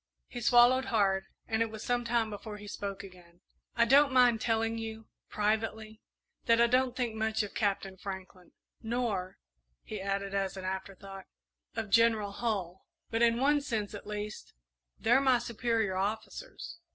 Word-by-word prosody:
He 245 - -7
swallowed 245 +3 +5
hard, 195 -5 +1 0.2
and 220 0 0
it 230 - +1
was 220 0 -8
some 245 0 0
time 230 -2 +1
before 210 +1 -7
he 205 0 -10
spoke 200 -1 -5
again. 180 -2 -15 0.3
"I 235 - +4
don't 280 +3 +6
mind 245 -3 +5
telling 225 0 0
you, 220 0 -6 0.2
privately, 220 +1 -2 0.5
that 230 0 +5
I 235 - +7
don't 250 +1 +2
think 240 -3 -1
much 220 0 0
of 205 - -7
Captain 195 -2 -1
Franklin, 190 -1 -8 0.3
nor," 220 -5 -2 0.5
he 215 -3 -6
added, 195 0 -2
as 195 -1 -1
an 185 - -6
afterthought, 190 0 -6 0.5
"of 220 -3 -4
General 225 -2 +4
Hull; 195 -5 -3 0.3
but, 225 0 0
in 235 0 +4
one 290 +2 +3
sense 220 -7 -3
at 205 - -8
least, 210 0 -6 0.4
they're 245 +4 +4
my 260 -2 +4
superior 230 -4 -1
officers. 220 - -4
220 Hz, 160 wpm, -31 LUFS, 200-235 Hz, 0.5 s, I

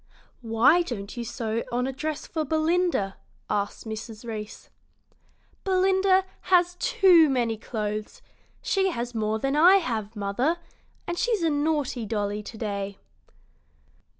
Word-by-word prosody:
"Why 235 +9 +4
don't 215 -11 -5
you 240 - -4
sew 225 0 -3
on 245 +1 0
a 265 - -3
dress 305 +3 -4
for 320 -2 -2
Belinda?" 315 - +1 0.3
asked 205 +2 -2
Mrs. 220 +1 -7
Reece. 215 -2 -7 0.9
"Belinda 380 0 +3 0.2
has 355 -1 +4
too 380 -10 +5
many 240 -4 +1
clothes; 215 -1 -5 0.4
she 385 -1 +2
has 245 -7 -4
more 220 -1 0
than 270 +5 -1
I 350 +6 +7
have, 230 - -1
mother, 215 +11 0 0.5
and 345 0 -3
she's 455 -7 +1
a 325 - +2
naughty 290 -6 -1
dolly 205 -1 -2
to 220 +2 -10
day." 200 -2 -4
245 Hz, 130 wpm, -26 LUFS, 215-345 Hz, 0.9 s, I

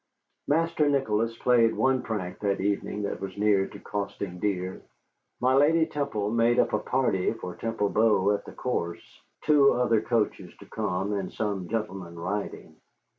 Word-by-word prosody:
Master 160 0 +2
Nicholas 115 -5 0
played 115 -2 +3
one 130 -1 +2
prank 95 -5 -4
that 100 -1 0
evening 100 +1 -1
that 100 - -3
was 95 -1 -6
near 100 -2 +3
to - - -11
costing 100 -3 -5
dear. 95 -2 -2 0.6
My 130 +1 +3
lady 160 +4 +4
Temple 125 -10 -2
made 115 +1 +3
up - - +2
a 105 - +2
party 115 -6 0
for 90 - -7
Temple 115 -3 -1
Bow 105 -3 +3
at 105 - -1
the - - -9
course, 85 -9 -4 0.2
two 145 -2 +5
other 115 -3 +2
coaches 115 -2 -1
to - - -13
come 95 +3 -2
and 100 -2 -3
some 100 -4 -3
gentlemen 95 -6 -4
riding. 100 +5 -5
105 Hz, 160 wpm, -27 LUFS, 95-125 Hz, 0.6 s, two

